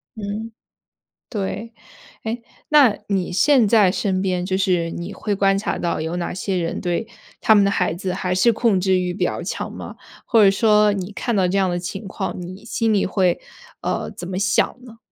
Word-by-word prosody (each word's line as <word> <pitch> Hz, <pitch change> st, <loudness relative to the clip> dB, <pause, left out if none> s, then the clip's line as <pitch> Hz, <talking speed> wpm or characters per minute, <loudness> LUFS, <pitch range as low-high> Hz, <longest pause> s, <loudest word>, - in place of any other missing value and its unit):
嗯， 215 Hz, +1 st, -5 dB, 0.8 s
对。 215 Hz, +2 st, -4 dB, 0.5 s
哎， 225 Hz, +2 st, -3 dB, 0.3 s
那 280 Hz, -8 st, +5 dB
你 190 Hz, -3 st, -1 dB
现 245 Hz, +3 st, +4 dB
在 205 Hz, -4 st, +5 dB
身 190 Hz, -2 st, 0 dB
边 180 Hz, -2 st, -1 dB
就 190 Hz, 0 st, -1 dB
是 180 Hz, -3 st, +1 dB
你 175 Hz, +4 st, -6 dB
会 210 Hz, 0 st, -2 dB
观 195 Hz, 0 st, +3 dB
察 205 Hz, -, -2 dB
到 170 Hz, -2 st, -1 dB
有 160 Hz, +2 st, -3 dB
哪 175 Hz, -, -3 dB
些 190 Hz, +1 st, -2 dB
人 170 Hz, -2 st, -2 dB
对 175 Hz, +5 st, -1 dB, 0.3 s
他 220 Hz, -, +5 dB
们 205 Hz, -1 st, +5 dB
的 200 Hz, -, +2 dB
孩 180 Hz, -4 st, 0 dB
子 185 Hz, +1 st, -3 dB
还 180 Hz, 0 st, -1 dB
是 210 Hz, +6 st, +4 dB
控 220 Hz, -4 st, +2 dB
制 190 Hz, 0 st, +2 dB
欲 180 Hz, -1 st, -1 dB
比 200 Hz, -, -1 dB
较 -, -, -2 dB
强 -, -, -4 dB
吗？ -, -, -8 dB, 0.3 s
或 230 Hz, -3 st, +5 dB
者 195 Hz, -, +7 dB
说 210 Hz, +1 st, +4 dB
你 195 Hz, 0 st, -4 dB
看 235 Hz, +3 st, -2 dB
到 190 Hz, -2 st, +3 dB
这 190 Hz, +2 st, 0 dB
样 190 Hz, -1 st, +2 dB
的 175 Hz, -, -1 dB
情 195 Hz, +4 st, -6 dB
况， 190 Hz, -1 st, -4 dB
你 185 Hz, +4 st, -9 dB
心 225 Hz, -1 st, 0 dB
里 205 Hz, -, +2 dB
会， 185 Hz, -2 st, +1 dB, 0.4 s
呃， -, -, -2 dB
怎 175 Hz, -, -8 dB
么 185 Hz, 0 st, -3 dB
想 205 Hz, 0 st, +2 dB, 0.2 s
呢？ 230 Hz, -2 st, -13 dB
195 Hz, 220 characters per minute, -21 LUFS, 180-215 Hz, 0.8 s, 者